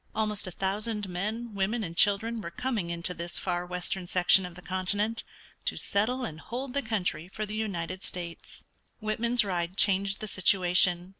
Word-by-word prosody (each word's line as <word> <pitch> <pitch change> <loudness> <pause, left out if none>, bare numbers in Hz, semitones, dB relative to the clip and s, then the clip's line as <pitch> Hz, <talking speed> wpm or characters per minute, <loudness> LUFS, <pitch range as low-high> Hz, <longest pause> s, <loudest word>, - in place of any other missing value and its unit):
Almost 215 -3 0
a - - -4
thousand 205 +3 -1
men, 215 +6 -3
women, 210 +4 0
and 170 -3 -5
children 220 +4 +3
were 170 - -5
coming 210 -1 -2
into 170 +1 0
this 170 0 -4
far 175 0 -1
western 180 +1 -2
section 180 +1 +5
of 175 - -12
the 180 - -10
continent 205 +5 0 0.4
to - - 0
settle 245 +6 0
and 155 -7 -6
hold 245 +7 -5
the 280 - +2
country 185 - -1
for 215 +3 -4
the 210 - -6
United 185 -4 -3
States. 170 -2 -8 0.4
Whitman's 230 +2 +2
ride 180 -1 -2
changed 195 0 +3
the 215 - -4
situation. 180 -2 +3
195 Hz, 170 wpm, -29 LUFS, 180-215 Hz, 0.4 s, section